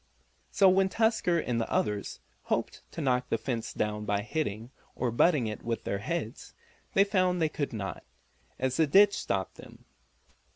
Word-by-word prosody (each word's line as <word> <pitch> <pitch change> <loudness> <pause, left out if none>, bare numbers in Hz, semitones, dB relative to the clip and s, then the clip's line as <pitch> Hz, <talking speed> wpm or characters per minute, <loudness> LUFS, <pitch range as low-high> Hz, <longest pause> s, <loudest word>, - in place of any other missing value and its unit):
So 195 - +4
when 190 +1 +4
Tusker 220 -5 +2
and 120 -7 -1
the - - -4
others 105 -2 -1 0.2
hoped - - -2
to - - -5
knock 125 -3 0
the - - +1
fence 115 0 -3
down 105 0 -2
by 105 -1 -1
hitting, 115 -2 -3 0.2
or 125 -1 -1
butting, 140 +2 +3
it 110 -1 -4
with 115 -1 -3
their 100 - -2
heads, 115 +1 -5 0.4
they 195 - +7
found 185 -3 +1
they 160 -2 +2
could 145 -2 -3
not, 100 -4 -5 0.5
as 130 0 -1
the 160 - +3
ditch 200 +6 +6
stopped 95 - -3
them. - - -14
125 Hz, 170 wpm, -29 LUFS, 110-180 Hz, 0.5 s, they